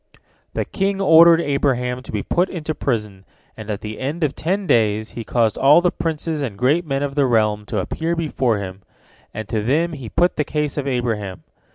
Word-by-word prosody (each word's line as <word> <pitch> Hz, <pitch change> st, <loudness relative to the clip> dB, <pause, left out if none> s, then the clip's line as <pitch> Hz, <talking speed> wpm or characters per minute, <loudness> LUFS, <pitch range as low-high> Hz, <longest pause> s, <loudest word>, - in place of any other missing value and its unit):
The -, -, -1 dB
king 195 Hz, 0 st, -1 dB
ordered 170 Hz, -2 st, +7 dB
Abraham 130 Hz, -4 st, 0 dB
to -, -, -10 dB
be 105 Hz, -2 st, -2 dB
put 180 Hz, +2 st, +1 dB
into 155 Hz, -3 st, -4 dB
prison, 105 Hz, -9 st, -3 dB, 0.3 s
and 110 Hz, -1 st, -9 dB
at 105 Hz, -2 st, -3 dB
the 105 Hz, 0 st, -7 dB
end 150 Hz, +6 st, -3 dB
of 145 Hz, -2 st, +1 dB
ten 190 Hz, +5 st, -2 dB
days 110 Hz, -, +1 dB
he 115 Hz, -, -6 dB
caused 110 Hz, -1 st, 0 dB
all 140 Hz, +4 st, +7 dB
the 175 Hz, 0 st, +1 dB
princes 160 Hz, -1 st, -3 dB
and 115 Hz, -8 st, -4 dB
great 150 Hz, -, +1 dB
men 135 Hz, 0 st, -1 dB
of 140 Hz, -1 st, -3 dB
the 140 Hz, -2 st, +2 dB
realm 105 Hz, -3 st, +1 dB
to 105 Hz, -, -3 dB
appear 160 Hz, -, -2 dB
before 135 Hz, -8 st, 0 dB
him, 95 Hz, -1 st, -7 dB, 0.5 s
and 110 Hz, -1 st, -6 dB
to 110 Hz, -2 st, -1 dB
them 155 Hz, +9 st, +1 dB
he 130 Hz, -7 st, -7 dB
put 175 Hz, +8 st, +1 dB
the 150 Hz, -, +2 dB
case 150 Hz, -1 st, -2 dB
of 140 Hz, -2 st, -3 dB
Abraham. 115 Hz, -7 st, -2 dB
135 Hz, 205 wpm, -20 LUFS, 110-160 Hz, 0.5 s, ordered